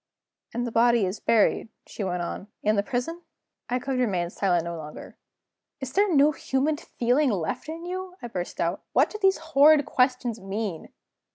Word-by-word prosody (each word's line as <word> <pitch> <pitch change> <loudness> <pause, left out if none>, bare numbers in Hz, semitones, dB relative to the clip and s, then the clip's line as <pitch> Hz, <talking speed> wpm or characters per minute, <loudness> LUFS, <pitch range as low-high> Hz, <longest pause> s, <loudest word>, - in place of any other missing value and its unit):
"And 240 +1 -2
the 240 - -4
body 235 -2 +4
is 190 +3 -3
buried," 225 0 +2 0.2
she 210 - -6
went 180 -2 -2
on, 180 +3 -5 0.2
"in 215 +1 +3
the 200 - +3
prison?" 250 +11 -3 0.5
I 250 - +1
could 255 +1 -2
remain 180 -8 0
silent 180 -4 +1
no 170 0 -4
longer. 150 -2 -9 0.6
"Is 265 -2 -6
there 400 0 +3
no 290 +2 +6
human 290 +1 -1
feeling 255 +2 +1
left 195 - -2
in 330 +2 -6
you?" 370 0 -5
I 240 - -6
burst 180 -6 -5
out. 170 +3 -1
"What - - +3
do 425 - -6
these 385 -1 +4
horrid 305 -2 +5
questions 250 -3 +1
mean?" 195 -3 -4
240 Hz, 180 wpm, -26 LUFS, 195-295 Hz, 0.6 s, no